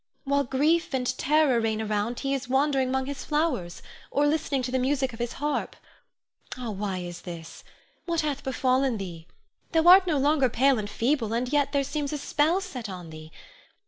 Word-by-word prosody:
While 280 0 +1
grief 295 +4 +1
and 255 0 -1
terror 295 -4 +3
reign 220 -1 0
around, 215 +2 -2
he 275 0 -1
is 270 -2 -3
wandering 270 -1 +2
'mong 265 0 0
his 280 0 -5
flowers, 295 - -1 0.3
or 285 - +1
listening 290 -3 0
to 250 - -3
the 260 - +1
music 265 0 0
of 225 - -10
his 240 0 -2
harp. 295 +1 -2 0.8
Ah, 245 -3 -4
why 195 -1 -3
is 175 -1 -6
this? 170 -3 -9 0.4
What 335 -1 +1
hath 290 -2 -3
befallen 260 -1 +1
thee? 175 -4 -7 0.5
Thou 325 +1 +3
art 370 +1 +8
no 310 -4 +2
longer 280 -1 +3
pale 265 +1 +3
and 205 -1 -4
feeble, 230 0 0
yet 280 +3 +1
there 280 -1 +1
seems 285 0 -3
a 300 - -2
spell 310 +6 +1
set 255 - -6
on 180 -3 -8
thee. 155 0 -11
265 Hz, 185 wpm, -26 LUFS, 225-290 Hz, 0.8 s, art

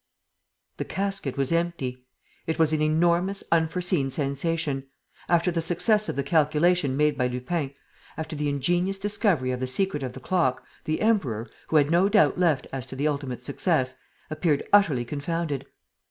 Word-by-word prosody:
_ - - -47
The - - -2
casket 195 -8 -2
was 135 +1 0
empty. 140 -7 -2 0.4
It 160 - -1
was 160 -1 +3
an 155 - +1
enormous, 170 +5 +2
unforeseen 165 -2 +1
sensation. 140 0 -2 0.4
After 175 +1 +3
the 165 -1 -1
success 210 +6 +2
of - - -2
the 140 - -1
calculation 155 0 +2
made 150 0 +3
by 125 -2 +1
Lupin, 135 +3 -3 0.4
after 160 0 -5
the 145 0 -1
ingenious 175 +7 0
discovery 195 - +1
of 125 - -3
the 130 - -2
secret 150 +2 -1
of 130 -2 -4
the 130 - -8
clock, 130 -4 0 0.2
the 155 - -1
Emperor, 140 - 0 0.2
who - - -2
had 145 0 +4
no 180 +4 +4
doubt 205 -3 +3
left 160 -7 +2
as 130 -1 -4
to 130 - -8
the 140 +3 0
ultimate 135 -5 -3
success, 135 -1 0 0.4
appeared 155 -2 0
utterly 155 -12 +4
confounded. 145 -1 -3
155 Hz, 170 wpm, -26 LUFS, 135-175 Hz, 0.4 s, had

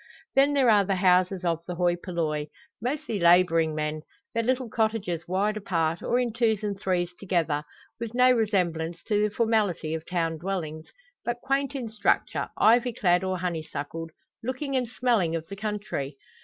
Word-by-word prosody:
Then 275 +2 +4
there 265 -5 +4
are 205 -2 +5
the 195 0 0
houses 185 0 +3
of 165 -1 0
the 180 - -4
hoi 175 0 +2
polloi, 160 -4 -2 0.3
mostly 245 -4 -2
labouring 170 -2 +4
men 155 0 -2 0.3
their 230 - +1
little 255 +2 0
cottages 215 -7 -1
wide 200 +4 0
apart, 165 -5 -1
or 240 - +1
in 245 -3 0
twos 220 -2 +1
and 205 -1 -1
threes 180 -3 0
together, 165 -6 0 0.4
with 230 0 -5
no 250 +1 +6
resemblance 175 -8 0
to 210 -1 +1
the 210 - +2
formality 210 -8 +1
of 160 0 -5
town 165 -3 -1
dwellings, 160 -4 -4 0.4
but 240 0 -2
quaint 275 +1 0
in 255 -4 -3
structure, 215 -2 0
ivy 235 +2 +4
clad 180 -3 +2
or 185 0 -1
honeysuckled, 165 -2 -4 0.3
looking 260 +3 -3
and 250 -2 +1
smelling 230 -9 +1
of 165 -1 -4
the 200 - -6
country. 205 -10 -4
190 Hz, 170 wpm, -27 LUFS, 165-225 Hz, 0.4 s, no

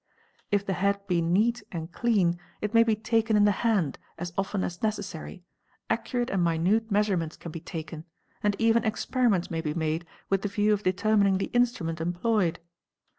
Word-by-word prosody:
If 200 -1 +1
the 195 - -1
head 200 +2 0
be 180 -4 +1
neat 215 +8 +2
and 165 -1 -5
clean, 185 -6 +1 0.2
it 210 +1 -3
may 230 - +7
be 225 -1 +3
taken 225 0 +1
in 205 - +5
the 205 - +5
hand 205 - +1 0.2
as 175 0 -5
often 195 0 -1
as 175 -1 -4
necessary, 200 -4 -4 0.5
ac - - +2
curate 245 -2 -1
and 190 -2 +1
minute 180 +7 +2
measurements 195 -6 0
can 170 - -8
be 165 - -6
taken, 160 -2 -7 0.4
and 205 -1 +1
even 230 0 +3
experiments 220 -4 +1
may 165 -1 -1
be 150 -1 -3
made 160 +1 -1 0.2
with 195 -1 +1
the 205 - -2
view 210 +1 +2
of 205 - -1
determining 200 0 +2
the 195 - -3
instrument 235 -10 +1
employed. 175 +1 +1
200 Hz, 180 wpm, -27 LUFS, 170-220 Hz, 0.5 s, may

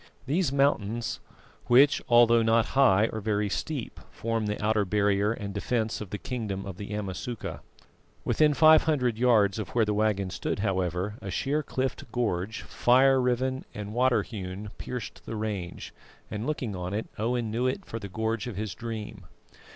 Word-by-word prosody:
These 150 +2 +1
mountains, 120 -5 0 0.5
which 135 +4 +5
although 120 -1 +6
not 115 0 +3
high 115 -7 +5
are 110 - -3
very 105 0 0
steep, 140 - -4
form 115 -1 -2
the 105 - -2
outer 105 0 +2
barrier 100 +1 +2
and 100 -3 -5
defence 110 +2 -1
of 105 - -6
the 105 - -4
kingdom 105 -5 -4
of 95 -3 -7
the 100 - -7
Amasuka. 105 +3 -5 0.7
Within 150 -1 +3
five 155 0 +7
hundred 125 -8 +1
yards 110 -5 +4
of 105 - -4
where 115 -2 +4
the 105 - 0
waggon 105 -3 0
stood, - - -3
however, 95 +1 -1
a 100 - -6
sheer 140 - 0
cliffed 130 -2 -3
gorge, 110 -3 -2
fire 130 +2 +4
riven 130 +1 0
and 105 0 -6
water 125 +1 +3
hewn, 100 -1 -7
pierced 125 -3 -6
the 115 - -4
range, 105 -5 -4 0.4
and 110 +2 -3
looking 130 -9 -2
on 90 +2 -4
it, 110 - -2
Owen 115 0 -1
knew 120 +3 0
it 155 +9 -2
for 115 - -6
the 100 - -7
gorge 110 +4 -2
of 120 - -5
his 105 -3 -3
dream. 110 -2 -7
110 Hz, 170 wpm, -28 LUFS, 100-125 Hz, 0.7 s, five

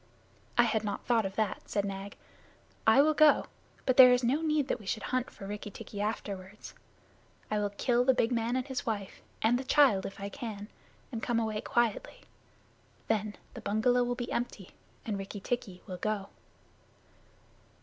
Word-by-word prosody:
"I 240 - +7
had 220 -2 +1
not 205 -1 -4
thought 230 -4 +2
of 190 - -10
that," 215 -2 -2
said 205 -1 0
Nag. 195 0 -6 0.7
"I 225 +6 +7
will 310 +1 +3
go, 305 -1 +5 0.4
but 255 -1 +2
there 255 -1 +10
is 250 0 +3
no 265 +6 +2
need 305 -3 +1
that - - -1
we 205 - -12
should 215 - -2
hunt 255 -1 0
for 195 - -11
Rikki 210 +1 -5
tikki 205 0 -7
afterward. 205 -2 -4 0.9
I 210 - +1
will 205 -1 0
kill 240 +4 +1
the 260 0 +4
big 235 -1 +2
man 235 0 0
and 255 -1 -1
his 265 -2 -4
wife, 205 -4 -4 0.2
and 235 +3 +3
the - - -4
child 260 -8 +4
if 195 - -10
I 200 - -4
can, 215 -4 -7 0.4
and 230 -3 -4
come 235 0 +1
away 220 -1 -2
quietly. 240 - -1 0.9
Then 215 -1 0 0.2
the - - -8
bungalow 245 +4 +2
will 245 0 -1
be 240 -1 -5
empty, 220 -6 -4 0.3
and 210 -4 -2
Rikki 195 +1 -6
tikki 195 -4 -4
will 185 - -6
go." 205 +1 -2
220 Hz, 180 wpm, -30 LUFS, 205-245 Hz, 0.9 s, there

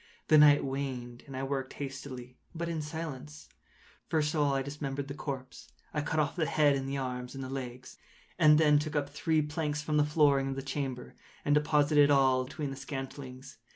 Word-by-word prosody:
The 155 - +7
night 145 -1 +7
waned, 130 -3 -4
and 135 -1 -7
I 135 - -3
worked 135 -1 -3
hastily, 135 -3 -7 0.2
but 170 +1 -3
in 165 -2 -2
silence. 135 - -7 0.6
First 155 -2 +1
of 155 - 0
all 145 -2 +2
I 135 - 0
dismembered 140 -1 -4
the 140 - -5
corpse. 135 -2 -7 0.2
I 150 - 0
cut 155 +2 -1
off 150 -2 0
the 165 -4 0
head 145 -2 +3
and 135 0 -3
the 140 - -2
arms 125 -1 -4
and 135 - -5
the 130 - -6
legs. 125 -2 -7 0.4
I - - +5
then 150 -1 +5
took 155 +1 -4
up 145 -1 -1
three 155 +1 +1
planks 150 0 -2
from 150 0 0
the 150 - +5
flooring 145 -2 +3
of 135 - -3
the 135 - -5
chamber, 135 -3 -4 0.3
and 145 - +3
deposited 150 -1 +4
all 130 -2 +4
between 145 +1 -5
the - - -5
scantlings. 135 -1 -7
140 Hz, 200 wpm, -30 LUFS, 135-150 Hz, 0.6 s, The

